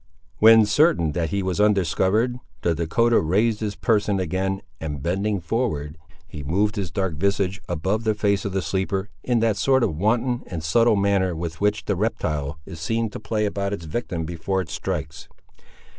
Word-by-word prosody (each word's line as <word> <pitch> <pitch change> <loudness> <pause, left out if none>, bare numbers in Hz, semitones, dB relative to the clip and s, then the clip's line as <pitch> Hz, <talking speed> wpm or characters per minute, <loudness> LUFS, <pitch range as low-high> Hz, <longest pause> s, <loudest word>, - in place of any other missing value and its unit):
When 110 0 +8
certain 105 - +3
that 80 +1 -1
he 100 -1 -1
was 95 +1 0
undiscovered, 105 +4 +2 0.2
the 85 - +2
Dahcotah 115 +9 +2
raised 105 +7 +1
his 105 -2 -3
person 105 -3 +1
again, 95 +2 -2 0.2
and 75 -3 -5
bending 100 +4 0
forward, 85 - -2 0.3
he 75 - -8
moved 100 +9 0
his 100 -4 -3
dark 95 +1 -1
visage 100 +2 0
above 95 +6 -1
the 110 -1 +1
face 100 -1 +1
of 100 - -3
the 95 0 -1
sleeper, 95 +4 -2
in 120 -3 +1
that 110 -3 +2
sort 130 +4 +3
of 80 - 0
wanton 120 +7 +1
and 85 -4 -5
subtle 115 +8 +3
manner 100 -3 +1
with 85 +1 -5
which 105 0 +1
the 100 - 0
reptile 75 -8 -2
is 80 - -9
seen 115 +7 -1
to - - -7
play 105 0 -1
about 100 -1 -2
its 85 -5 -5
victim 85 -1 -3
before 85 +3 -2
it 85 - -8
strikes. 85 -3 -4
100 Hz, 180 wpm, -23 LUFS, 85-105 Hz, 0.3 s, When